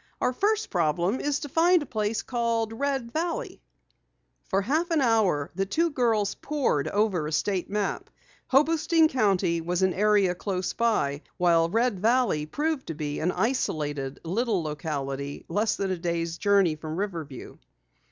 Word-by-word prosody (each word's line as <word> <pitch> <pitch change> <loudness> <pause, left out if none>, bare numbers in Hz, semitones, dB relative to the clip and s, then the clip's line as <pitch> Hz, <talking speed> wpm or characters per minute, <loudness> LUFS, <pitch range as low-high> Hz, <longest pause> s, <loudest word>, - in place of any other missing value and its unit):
Our 250 - +1
first 420 - 0
problem 175 - +1
is 290 -1 -1
to 295 - -4
find 340 +2 +4
a - - -9
place 215 -3 -2
called 230 -2 -1
Red 265 -1 -2
Valley." 335 - -3 0.9
For 195 - +1
a - - -6
half 310 - 0
hour 220 - +2
the 195 +2 -1
two 330 - +1
girls 225 -7 +1
poured 275 - -1
over 200 -7 0
a - - -5
state 185 +3 -1
map. 205 0 -2 0.4
Hobostein 320 +3 +3
County 190 - +1
was 175 +3 -1
an 190 -1 +3
area 205 -2 +3
close 185 0 -3
by, 210 -12 0 0.2
while 170 -2 +3
Red 225 0 +1
Valley 220 -8 +2
proved 300 - -2
to 165 - -4
be 145 -1 -4
an 175 +3 +1
isolated 150 - -2
little 200 +2 0
locality 140 -2 -4
less 210 +1 0
than 195 -1 -2
a 185 - -1
day's 170 -1 -2
journey 200 -5 +3
from 155 0 -6
Riverview. 165 -9 -5
200 Hz, 155 wpm, -26 LUFS, 165-250 Hz, 0.9 s, find